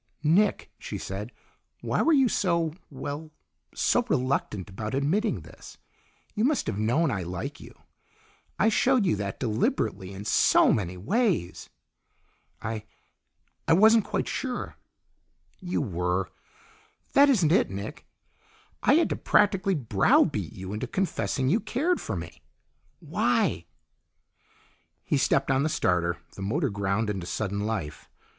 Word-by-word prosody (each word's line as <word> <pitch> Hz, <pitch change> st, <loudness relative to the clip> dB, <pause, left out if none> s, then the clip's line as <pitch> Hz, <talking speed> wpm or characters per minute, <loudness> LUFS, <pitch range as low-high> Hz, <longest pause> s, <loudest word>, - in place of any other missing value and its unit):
"Nick," 185 Hz, +7 st, +2 dB
she -, -, -6 dB
said, 100 Hz, +5 st, -6 dB, 0.5 s
"why -, -, 0 dB
were 330 Hz, -, +3 dB
you 270 Hz, -4 st, +5 dB
so 170 Hz, -7 st, 0 dB, 0.2 s
well, 145 Hz, +3 st, -6 dB, 0.5 s
so 245 Hz, -, +2 dB
reluctant 125 Hz, -, -1 dB
about 105 Hz, +5 st, -5 dB
admitting 180 Hz, +11 st, 0 dB
this? -, -, -13 dB, 0.6 s
You 215 Hz, -, -1 dB
must 285 Hz, +3 st, +1 dB
have 100 Hz, -, -3 dB
known 135 Hz, +8 st, +2 dB
I 100 Hz, -4 st, -2 dB
like 90 Hz, 0 st, -5 dB
you. -, -, -13 dB, 0.8 s
I 215 Hz, -, +3 dB
showed 250 Hz, 0 st, +3 dB
you 175 Hz, -, +2 dB
that 100 Hz, -1 st, -4 dB
deliberately 105 Hz, -4 st, -1 dB
in 100 Hz, +1 st, -8 dB
so -, -, +4 dB
many 90 Hz, -4 st, -2 dB
ways." 190 Hz, -, -1 dB, 0.9 s
"I 110 Hz, -1 st, -4 dB, 0.8 s
I -, -, +5 dB
wasn't 220 Hz, +5 st, +6 dB
quite -, -, -2 dB
sure." 255 Hz, -2 st, -4 dB, 0.8 s
"You 180 Hz, -5 st, -2 dB
were! 90 Hz, -3 st, -1 dB, 0.8 s
That 280 Hz, +1 st, +6 dB
isn't 185 Hz, -, +3 dB
it, 185 Hz, -, +3 dB
Nick. 100 Hz, +10 st, -7 dB, 0.7 s
I -, -, +4 dB
had 335 Hz, -, +3 dB
to -, -, -1 dB
practically 195 Hz, -2 st, +2 dB
browbeat 125 Hz, -9 st, +2 dB
you 95 Hz, +1 st, -7 dB
into 110 Hz, +4 st, -3 dB
confessing 155 Hz, -6 st, -1 dB
you 185 Hz, -, +3 dB
cared 280 Hz, -, -1 dB
for -, -, -4 dB
me. -, -, -8 dB, 0.6 s
Why?" -, -, 0 dB, 1.4 s
He 145 Hz, -, 0 dB
stepped 135 Hz, 0 st, +2 dB
on 135 Hz, 0 st, +2 dB
the 155 Hz, -, +1 dB
starter; 90 Hz, -, +1 dB, 0.2 s
the -, -, -10 dB
motor 135 Hz, -, 0 dB
ground 100 Hz, +2 st, -1 dB
into 95 Hz, -4 st, -3 dB
sudden 100 Hz, 0 st, -2 dB
life. 100 Hz, -9 st, -4 dB
135 Hz, 135 wpm, -27 LUFS, -, 1.4 s, wasn't